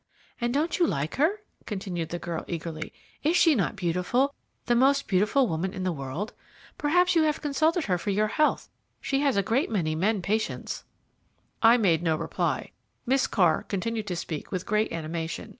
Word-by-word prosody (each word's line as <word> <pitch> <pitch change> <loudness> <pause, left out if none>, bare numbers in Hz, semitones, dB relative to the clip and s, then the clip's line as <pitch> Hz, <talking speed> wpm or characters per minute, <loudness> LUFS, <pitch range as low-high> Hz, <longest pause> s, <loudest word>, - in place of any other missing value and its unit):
"And 240 -1 0
don't 305 +8 0
you 345 - +4
like 140 +3 -2
her?" 350 +9 +2 0.3
continued 185 -5 -4
the 175 - -3
girl 170 -1 -4
eagerly. 165 -2 -5 0.3
"Is 325 +4 +2
she 325 - +6
not 215 -3 0
beautiful, 190 +10 0 0.3
the 240 - +2
most 275 +3 +3
beautiful 210 +7 +3
woman 175 +2 -2
in 185 - -4
the 185 - 0
world? 145 +7 -5 0.4
Perhaps 360 +5 +3
you 330 - +5
have 310 -1 +1
consulted 315 +3 +1
her 180 -3 0
for 170 - -3
your 210 +2 +1
health; 305 +6 +1 0.3
she 270 - 0
has 275 -6 +2
a 200 - +3
great 235 +8 +1
many 170 -8 0
men 195 +4 0
patients." 215 +4 -2 0.8
I 230 +1 +7
made 175 -8 +3
no 165 -2 +1
reply; 165 - -2 0.3
Miss 265 +2 +2
Carr 175 -7 +3
continued 220 +2 -2
to 180 - -2
speak 160 -3 -5
with 185 -1 -3
great 215 +1 +1
animation. 165 0 -4
210 Hz, 180 wpm, -27 LUFS, 170-275 Hz, 0.8 s, I